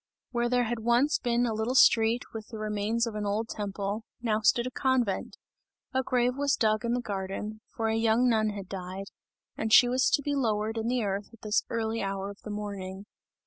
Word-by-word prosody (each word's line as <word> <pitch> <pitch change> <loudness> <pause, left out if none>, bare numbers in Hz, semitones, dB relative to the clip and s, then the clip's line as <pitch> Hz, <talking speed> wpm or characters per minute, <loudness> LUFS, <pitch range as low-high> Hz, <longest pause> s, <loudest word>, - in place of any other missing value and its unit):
Where 240 -1 0
there 245 0 +3
had 235 0 -2
once 240 +6 +2
been 240 0 +1
a 230 - -1
little 220 +4 -1
street 230 -1 +5
with 220 -1 -7
the 225 - -8
remains 215 +2 0
of 230 - -4
an 210 0 -3
old 210 +3 -1
temple, 205 +1 -3 0.2
now 220 -3 0
stood 235 +3 +3
a 255 - -3
convent; 245 -6 0 0.6
a 260 - +2
grave 250 -1 +1
was 285 -1 +2
dug 215 0 +1
in 235 0 0
the 245 - -1
garden, 205 +1 -4
for 225 - -1
a 220 - +1
young 225 +2 +3
nun 220 -2 +3
had 200 -2 -6
died, 190 +1 -6 0.4
and 220 - -2
she 245 - +8
was 255 +2 +2
to 285 - +2
be 290 - -1
lowered 220 -4 0
in 225 - -2
the 245 -1 +1
earth 200 0 -2
at 230 - -17
this 210 0 +2
early 225 0 -1
hour 195 0 -3
of 200 - -15
the - - -9
morning. 200 -2 -5
220 Hz, 215 wpm, -28 LUFS, 205-240 Hz, 0.6 s, she